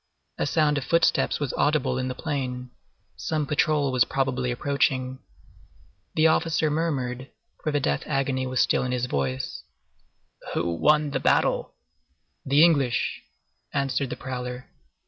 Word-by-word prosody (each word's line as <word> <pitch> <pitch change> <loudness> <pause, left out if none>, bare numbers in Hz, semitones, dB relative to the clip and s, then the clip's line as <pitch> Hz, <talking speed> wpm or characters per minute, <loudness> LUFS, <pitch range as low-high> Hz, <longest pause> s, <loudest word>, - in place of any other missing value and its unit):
A - - +1
sound 150 -2 +2
of - - -6
footsteps 170 +4 +2
was 145 -3 -2
audible 150 -3 +1
in 130 - -2
the 130 - -4
plain; 125 -5 -4 0.5
some 155 -2 -1
patrol 145 -1 +1
was 130 -2 +4
probably 130 -2 -1
approaching. 130 0 0 1.0
The 155 - +3
officer 160 -1 +2
murmured, 135 -5 -2 0.3
for 155 - -1
the 145 - +1
death 70 - 0
agony 135 -2 0
was 130 -1 -1
still - - +2
in 125 0 -2
his 125 0 0
voice:— 65 - -2 0.9
"Who 85 0 0
won 150 - +3
the - - -1
battle?" - - +1 0.7
"The 140 +3 +5
English," 140 -8 +2 0.5
answered 140 -1 0
the - - -4
prowler. 125 -1 -6
135 Hz, 140 wpm, -25 LUFS, 125-150 Hz, 1.0 s, The